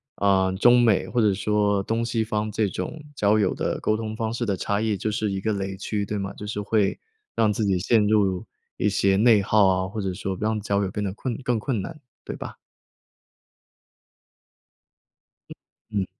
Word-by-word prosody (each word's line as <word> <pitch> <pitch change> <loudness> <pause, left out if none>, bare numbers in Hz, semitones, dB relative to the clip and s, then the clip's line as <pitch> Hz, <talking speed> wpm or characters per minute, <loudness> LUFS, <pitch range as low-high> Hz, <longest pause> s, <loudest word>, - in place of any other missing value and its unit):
啊， 95 -2 +2
中 120 +6 +5
美 110 -5 +3
或 120 - 0
者 105 -2 +3
说 105 0 +1
东 115 +3 -1
西 115 -1 0
方 110 -1 -2
这 110 0 +1
种 95 - -5
交 105 -1 +3
友 100 -3 +2
的 - - -2
沟 110 - +1
通 110 -1 -4
方 110 0 -2
式 120 0 -2
的 100 - 0
差 100 +3 -1
异， 110 -3 0
就 110 - -2
是 105 -1 -1
一 95 - -2
个 110 +2 -1
雷 95 -1 -3
区， 100 +1 -2
对 105 +1 -3
吗？ 100 0 -4
就 105 - -9
是 105 0 -3
会 100 -1 +1 0.4
让 110 -2 +3
自 105 +1 -1
己 95 -2 +1
陷 110 +3 +3
入 100 -4 +2 0.3
一 105 - +1
些 95 0 +2
内 110 0 +5
耗 105 0 +4
啊， 95 0 +1
或 105 +2 -5
者 95 -2 -2
说 95 +1 -4
让 110 0 0
交 100 -1 0
友 95 - -2
变 105 - -3
得 95 -2 -2
困 120 +3 -4
更 125 -2 +1
困 110 -1 -2
难， 155 - -7 0.3
对 - - -5
吧？ - - -8 2.9
嗯 - - -9 0.4
嗯。 95 - -2
105 Hz, 215 characters per minute, -24 LUFS, 95-110 Hz, 2.9 s, 中